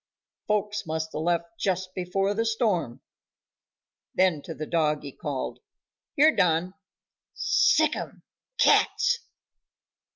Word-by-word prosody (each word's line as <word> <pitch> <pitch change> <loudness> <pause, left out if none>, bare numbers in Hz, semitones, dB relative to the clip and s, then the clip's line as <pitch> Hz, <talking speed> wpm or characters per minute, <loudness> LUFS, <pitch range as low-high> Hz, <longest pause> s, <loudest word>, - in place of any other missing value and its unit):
"Folks 210 -1 -1
must've 160 0 -3
left 170 +5 -1
just 185 -1 -1
before 195 +2 -1
the 225 +2 0
storm." 210 - -1 1.1
Then 180 -5 +3
to 165 - -8
the 155 - -5
dog 150 -2 0
he 140 - -7
called, 140 -1 -5 0.6
"Here, 305 +2 +5
Don, 175 +1 +2 0.6
sick'em - - +1 0.3
cats!" 485 0 +3
180 Hz, 100 wpm, -26 LUFS, 160-210 Hz, 1.1 s, Here